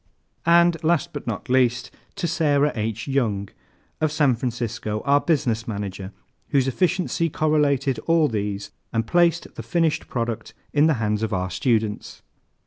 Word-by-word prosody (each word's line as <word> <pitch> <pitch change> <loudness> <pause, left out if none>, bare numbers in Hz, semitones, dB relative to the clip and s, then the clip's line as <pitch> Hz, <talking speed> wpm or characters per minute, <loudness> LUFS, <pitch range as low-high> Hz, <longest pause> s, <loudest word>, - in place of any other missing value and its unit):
And 170 0 +4
last 160 -3 +1
but - - -7
not 110 -3 -4
least, 125 -1 +2 0.2
To 195 -4 -2
SARAH 150 -3 +2
H. 110 +2 -3
YOUNG, 110 -8 0 0.5
of 155 -1 +2
San 150 -3 +3
Francisco, 115 -3 -3
our 140 +1 +4
Business 120 -9 0
Manager, 100 -3 -5 0.4
whose 135 -2 +2
efficiency 175 +3 0
correlated 145 -4 +1
all 165 -2 +4
these 105 -4 -3 0.2
and 115 0 0
placed 170 +3 +2
the - - -7
finished 165 -3 0
product 115 -2 -4 0.2
in 150 +2 +4
the 160 - +3
hands 105 -2 -1
of 110 -1 -1
our 95 0 -1
students. 110 - -1
130 Hz, 145 wpm, -23 LUFS, 110-155 Hz, 0.5 s, And